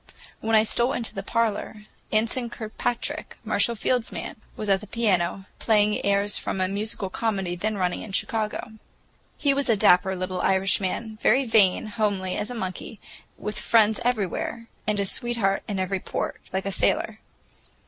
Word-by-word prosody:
When 225 0 +1
I 215 - +6
stole 240 +4 +1
into 235 -4 -3
the 195 - -4
parlor 215 0 -1 0.3
Anson 230 +3 +1
Kirkpatrick, 230 +1 -3
Marshall 235 - +2
Field's 245 +2 0
man, - - -5 0.2
was 215 - -4
at 195 -1 +3
the 210 - -10
piano, 195 -4 0
playing 210 -1 +3
airs 200 +1 +2
from - - -3
a 185 - +2
musical 200 0 -2
comedy 195 -5 -1
then 210 +4 -2
running 180 -2 0
in 215 - -8
Chicago. 215 +2 -2 0.7
He 285 -2 +3
was 275 -1 0
a 225 - +4
dapper 190 0 +5
little 185 0 -3
Irishman, 195 +3 +1
very 260 +4 +4
vain, 215 -4 +4
homely 205 -4 -1
as 210 - -2
a 245 - -5
monkey, 190 0 -5 0.4
with 210 0 -3
friends 220 -1 +4
everywhere, 230 0 -1 0.2
and 210 -1 +1
a 200 - +1
sweetheart 225 -3 0
in 205 - -2
every 190 0 -1
port, - - -4
like 190 +1 -2
a 195 - -1
sailor. - - +1
210 Hz, 165 wpm, -25 LUFS, 195-225 Hz, 0.7 s, I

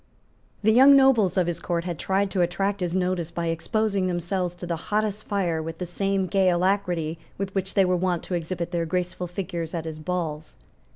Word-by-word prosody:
The 220 +1 +5
young 270 +4 +8
nobles 235 -9 +4
of 185 - +3
his 170 -1 -2
court 170 -2 -2
had 175 -3 -4
tried 195 +1 0
to 190 - +1
attract 195 +4 0
his 180 -1 -2
notice 180 -3 0
by 170 -1 -3
exposing 195 +4 0
themselves 180 0 -2
to 175 - -7
the 170 -1 -1
hottest 210 0 0
fire 180 -6 0
with 160 +1 -6
the 180 - -4
same 195 +2 0
gay 190 0 +3
alacrity 175 -3 0 0.2
with 195 0 -4
which 195 -1 -2
they 195 -2 +5
were 180 0 +2
wont 180 -1 0
to - - -6
exhibit 170 0 -3
their 170 -1 -1
graceful 180 +1 -2
figures 175 -2 -4
at 165 -1 -3
his 160 -1 -6
balls. 160 -2 -4
180 Hz, 205 wpm, -25 LUFS, 170-195 Hz, 0.2 s, young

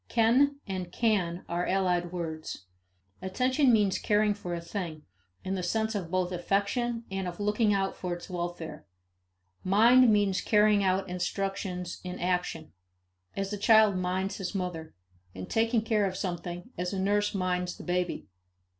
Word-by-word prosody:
Ken 255 +5 +3
and 185 -3 -4
can 185 -7 0
are 175 +1 -1
allied 180 -2 +1
words. 160 - -5 0.6
Attention 255 +8 +2
means 205 -4 +3
caring 210 0 +2
for 180 -4 -5
a - - -3
thing, 170 -3 -5 0.4
in 190 - -2
the 190 - -2
sense 220 +5 0
of 190 -6 -3
both 185 0 0
affection 205 +6 -1
and 195 -1 -2
of 175 +1 -6
looking 210 +1 +2
out 195 -1 0
for 180 -1 -3
its 175 - -10
welfare. 175 -4 -5 0.8
Mind 230 +5 +6
means 205 -3 +2
carrying 210 -1 +4
out 190 0 +1
instructions 180 0 -3
in 180 0 -6
action 180 -3 -2 0.6
as 195 +1 -2
a - - -2
child 215 -1 +5
minds 185 +1 -1
his 195 +1 -5
mother 175 -4 -4 0.4
and 95 0 -7
taking 225 0 +2
care 215 -3 +2
of 185 -1 -4
something 175 +2 -5
as 180 +2 -2
a 195 - -2
nurse 205 +2 +1
minds 180 -1 -1
the - - -9
baby. 180 0 -1
190 Hz, 155 wpm, -29 LUFS, 180-210 Hz, 0.8 s, Mind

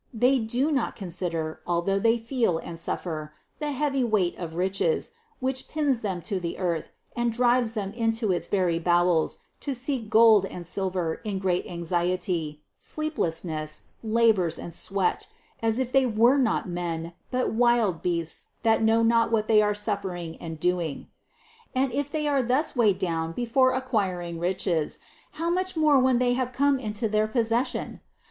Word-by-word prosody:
They 250 +3 +3
do 245 +7 0
not 270 -5 0
consider, 170 -4 -3
although 175 +3 +1
they 230 +3 +3
feel 230 -6 0
and 165 0 -7
suffer, 155 -3 -3 0.2
the 300 -1 -2
heavy 275 -1 0
weight 210 -7 +1
of 165 -2 -6
riches, 190 - 0 0.3
which 260 0 -1
pins 290 -5 0
them 190 -5 -3
to 195 +2 -2
the 170 -2 -4
earth 175 -3 -2 0.3
and 240 0 0
drives 240 0 +2
them 200 -2 -3
into 225 -2 0
its 175 - -1
very 180 -4 +1
bowels 175 -1 +2 0.2
to 280 -2 -3
seek 250 -3 -3
gold 220 -3 +6
and 175 -2 -8
silver 180 -2 -2
in 210 -3 -3
great 185 -2 0
anxiety, 175 -2 -2 0.2
sleeplessness, 165 - -3 0.2
labors 220 -7 +2
and 170 - -6
sweat, 190 +2 -1 0.3
as 225 0 +1
if 255 -1 -1
they 270 -1 +4
were 235 +5 +4
not 230 -4 +1
men, 170 -1 -4 0.2
but 255 -2 -1
wild 230 -6 +2
beasts 170 -2 -2 0.2
that 225 -1 +3
know 225 +1 +3
not 230 0 +3
what 215 -1 +1
they 215 -1 +5
are 210 0 +1
suffering 195 -5 -3
and 160 -2 -7
doing. 175 -4 -1 0.7
And 260 -1 +1
if 285 +1 -1
they 300 0 -2
are 280 -2 +2
thus 260 +6 0
weighed 215 -6 +3
down 165 -3 -2
before 255 +4 +2
acquiring 190 -10 -2
riches, 175 -3 0 0.4
how 335 +2 -1
much 370 0 0
more 300 -3 +5
when 255 -1 +3
they 245 0 +2
have 255 0 -1
come 280 +1 +2
into 215 -1 -2
their 215 0 +1
possession 230 +2 -1
215 Hz, 165 wpm, -26 LUFS, 175-245 Hz, 0.7 s, gold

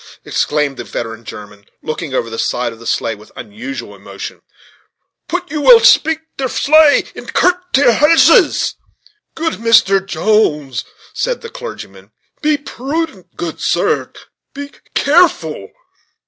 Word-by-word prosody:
exclaimed 145 -3 -1
the - - -5
veteran 115 0 -6
German, 105 -2 -11 0.2
looking 155 -1 -5
over 125 -3 -1
the 115 0 -6
side 120 -1 -1
of 115 - -16
the 115 - -10
sleigh 115 - -1
with 105 0 -15
unusual 235 +6 -8
emotion, - - -9 0.9
"put 355 -1 -4
you 300 -1 -2
will 480 +7 +8 0.2
preak 320 -1 -2 0.2
ter 265 - 0
sleigh 305 +3 +4
and - - -9
kilt 360 - +4 0.2
ter 270 -2 +4
horses!" 315 +6 +4 0.6
"Good 325 -5 -3
Mr. 220 -4 +4
Jones," 150 - 0 0.3
said - - -2
the 465 - -9
clergyman, 485 - -9 0.3
"be 305 -1 +2
prudent, 280 - -5
good 170 -2 -6
sir - - 0 0.4
be 285 0 -7 0.2
careful." 275 - +2
230 Hz, 135 wpm, -16 LUFS, -, 0.9 s, will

